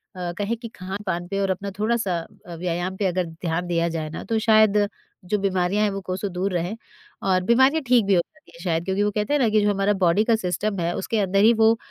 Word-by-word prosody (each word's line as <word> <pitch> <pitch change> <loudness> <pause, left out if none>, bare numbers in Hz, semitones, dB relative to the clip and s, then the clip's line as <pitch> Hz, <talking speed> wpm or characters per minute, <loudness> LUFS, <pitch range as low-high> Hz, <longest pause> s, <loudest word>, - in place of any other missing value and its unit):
अ, 180 -1 -4
कहें 205 +3 -1
कि 230 +1 -8
खानपान 185 -2 -4
पर 195 +2 -2
और 195 - 0
अपना 200 +2 -4
थोड़ा-सा 215 -4 0 0.3
अ, 170 - -8
व्यायाम 175 +2 -3
पे 205 - -1
अगर 180 -1 0
ध्यान 165 +1 -3
दिया 170 -1 +1
जाए 160 -2 -4
ना, 160 - -7
तो 225 -1 -1
शायद 215 -2 +4 0.4
जो 210 +3 0
बीमारियाँ 195 +1 +1
हैं 210 - +2
वो 195 0 -4
कोसो 185 +2 -3
दूर 185 +2 -2
रहें। 175 +4 -2 0.5
और 185 -1 +2
बीमारियाँ 265 +9 +4
ठीक 240 -4 +4
भी 200 - +2
हो 175 - +4
सकती 170 - -21
हैं 170 - -12
शायद, 165 -1 -1
क्योंकि 195 +1 0
वो 210 - +1
कहते 210 +7 -1
हैं 295 - +3
ना 235 -5 +3
कि 215 0 +3
जो 205 - +2
हमारा 200 +1 +1
बॉडी 175 +5 +4
का 230 -1 +4
सिस्टम 195 0 -2
है 170 0 0
उसके 220 +3 -1
अंदर 195 0 +2
ही 225 +2 +7
वो 225 0 +4
195 Hz, 245 wpm, -23 LUFS, 180-215 Hz, 0.5 s, ही